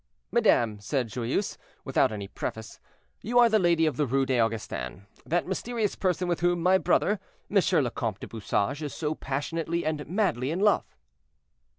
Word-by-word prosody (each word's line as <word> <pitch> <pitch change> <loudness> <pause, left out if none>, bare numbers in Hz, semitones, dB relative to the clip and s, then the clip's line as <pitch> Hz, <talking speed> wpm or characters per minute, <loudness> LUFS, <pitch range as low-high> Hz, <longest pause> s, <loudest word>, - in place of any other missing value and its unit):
"Madame," 120 - +3
said 125 +3 -1
Joyeuse, 125 - -2 0.3
without - - +2
any 100 -2 -5
preface, 110 +2 -6 0.4
"you 240 +3 -1
are 240 -1 +7
the 220 -1 +4
lady 170 -3 +3
of 155 - 0
the 150 -2 +1
Rue 135 +2 +2
des 130 -2 +1
Augustins; 105 - -3 0.2
that 175 +2 +1
mysterious 215 +2 -2
person 180 -1 0
with 175 -1 0
whom 175 0 +2
my 185 +1 +5
brother, 205 +1 +2 0.3
Monsieur 190 -6 +3
le 120 - -2
Comte 110 -4 -3
du - - -7
Bouchage, 115 +5 -1
is 150 -2 -5
so 155 -1 -1
passionately 165 +4 -3
and 155 -1 -2
madly 170 - 0
in 165 +4 -1
love." 205 0 +2
155 Hz, 175 wpm, -27 LUFS, 120-185 Hz, 0.4 s, are